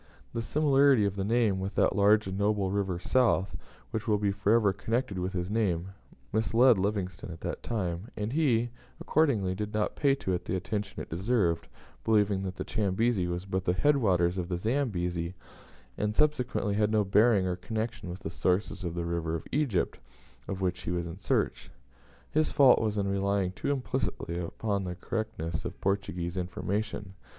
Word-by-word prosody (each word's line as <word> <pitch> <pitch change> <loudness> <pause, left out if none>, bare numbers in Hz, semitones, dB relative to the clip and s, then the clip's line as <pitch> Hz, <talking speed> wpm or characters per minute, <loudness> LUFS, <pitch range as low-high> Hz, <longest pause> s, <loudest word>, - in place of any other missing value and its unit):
The 115 - -1
similarity 140 -2 +4
of 100 -1 -1
the 95 - -2
name 110 -2 +2
with 95 +1 -4
that - - +3
large 105 +1 +5
and 95 0 -4
noble 100 -1 +1
river 95 -3 -1
south, 100 -1 +2 0.4
which 110 0 -3
will 105 -2 +3
be 100 -1 +1
for 100 +1 0
ever 105 -4 +3
connected 110 -1 -2
with 90 +2 -2
his 90 +1 -2
name, 95 -5 0 0.4
misled 115 +1 +4
Livingstone 95 -3 -2
at 80 0 -9
that - - -4
time, 95 -2 -3
and 105 +3 -2
he, 120 -7 +2 0.3
accordingly, 120 -12 +2
did 105 +2 -4
not 105 -1 0
pay 140 -2 +3
to 95 -9 -2
it 90 0 -2
the 95 - -1
attention 100 +3 -3
it - - -12
deserved, 90 -1 +1 0.4
believing 105 -3 +2
that 95 -1 -4
the - - -4
Chambezi 105 -1 +1
was 90 +1 -3
but 95 -1 -2
the 90 - +2
head 150 +8 +4
waters 90 -6 +2
of 90 0 -4
the 90 - -1
Zambezi, 90 -7 -1 0.6
and 105 0 0
consequently 125 -8 +1
had 105 +1 +2
no 110 -1 +3
bearing 105 0 +4
or 90 -1 0
connection 110 +1 -4
with 90 +2 -7
the 80 - -5
sources 90 +3 0
of 85 -1 -3
the 85 -1 -2
river 85 -1 -1
of 80 - -5
Egypt, 135 -10 0 0.5
of 95 -1 -4
which 90 -1 -1
he - - -5
was 85 -1 -1
in 85 +2 -7
search. - - -1 0.6
His 155 0 +2
fault 140 -3 +6
was 105 -2 -1
in 100 -1 0
relying 100 -1 0
too 95 - -4
implicitly 125 -10 -2
upon 100 +3 -2
the 90 -1 -4
correctness 105 -7 -3
of - - -6
Portuguese 95 -3 -2
information. 100 +2 -3
100 Hz, 185 wpm, -29 LUFS, 90-110 Hz, 0.6 s, fault